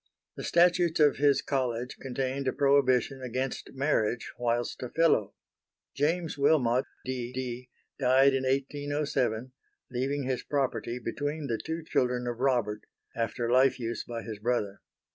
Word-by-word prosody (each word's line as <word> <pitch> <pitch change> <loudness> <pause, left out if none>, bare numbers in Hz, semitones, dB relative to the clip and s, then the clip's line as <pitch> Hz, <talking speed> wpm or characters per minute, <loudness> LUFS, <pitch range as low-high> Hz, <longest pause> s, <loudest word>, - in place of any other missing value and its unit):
The - - -7
Statutes 175 -1 +3
of 150 -2 +5
his 145 0 +3
College 125 -3 -2
contained 135 +1 -2
a 130 - +1
prohibition 135 -1 +3
against 130 +1 -3
marriage 125 -5 0
whilst 120 0 -1
a 125 - -4
Fellow. 160 -11 +2 0.6
James 160 +1 -1
Wilmot 130 -4 +3 0.2
D. 125 -2 -3
D. 125 -1 -5 0.3
died 135 +1 +5
in 135 - +1
1807 135 -3 -1 0.4
leaving 135 +3 -1
his 130 -1 -1
property 130 -4 -1
between 145 +6 -3
the 115 -5 -2
two 160 0 -4
children 125 -4 0
of 120 -1 -3
Robert, 120 -6 +1 0.3
after 115 +1 -1
life 130 +1 +4
use 115 -1 -3
by 115 -1 -6
his 110 -3 -7
brother. 105 -3 -1
130 Hz, 140 wpm, -29 LUFS, 120-140 Hz, 0.6 s, of